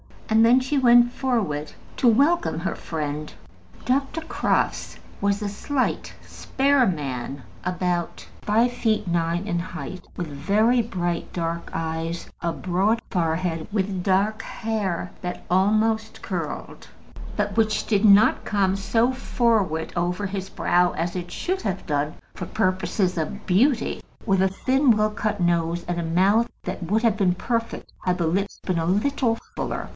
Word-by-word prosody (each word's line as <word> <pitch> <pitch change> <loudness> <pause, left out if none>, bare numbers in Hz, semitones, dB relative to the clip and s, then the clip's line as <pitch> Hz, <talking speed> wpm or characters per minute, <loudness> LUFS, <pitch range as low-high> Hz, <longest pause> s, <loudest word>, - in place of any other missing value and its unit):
And 220 +1 +5
then 250 +3 +5
she 265 +3 -1
went 240 -2 +6
forward 205 - -1 0.2
to 250 - +3
welcome 285 - +3
her 185 - -1
friend. 150 -1 -4 0.5
Dr. 275 +5 0
Crofts 315 - -1 0.2
was 200 +1 0
a 205 - -2
slight, 255 +6 -2
spare 270 -1 +1
man, 135 -5 -3 0.2
about 180 -1 -2 0.2
five 230 +4 +2
feet 220 -4 0
nine 170 +1 0
in 175 -4 -1
height, 185 +1 -6
with 175 - -4
very 205 - +2
bright 175 -6 -3
dark 170 -1 -3
eyes, 165 +1 -3
a 170 -1 -1
broad 195 +6 +1
forehead, 165 -2 -1
with 190 -3 -1
dark 200 +3 +1
hair 210 -8 -3
that 180 0 -5
almost 215 +4 +2
curled, - - -5 0.5
but 205 -1 -1
which 220 -1 +2
did 210 -1 +2
not 205 +1 +6
come 195 -2 +1
so 225 +5 +2
forward 225 -10 0
over 180 +3 -1
his 190 -1 -4
brow 175 0 +2
as 170 +1 -2
it 175 -1 -4
should 370 - -2
have 190 -3 -3
done 150 0 -1 0.2
for - - -6
purposes 185 -2 0
of 185 +6 -3
beauty, 230 +6 +2 0.2
with 195 -3 +2
a 190 - +4
thin 260 +7 +2
well 215 0 +2
cut 210 -1 -2
nose, 170 0 +1
and 175 -1 -1
a - - -2
mouth 195 +8 +3
that 185 +1 -5
would 210 +7 0
have 225 -3 +3
been 185 -4 +2
perfect 230 +4 -3
had 180 -1 +1
the 170 - 0
lips 195 +5 -1
been 180 -3 0
a 165 - -1
little 225 +5 +1 0.2
fuller. - - -3
195 Hz, 150 wpm, -24 LUFS, 175-225 Hz, 0.5 s, went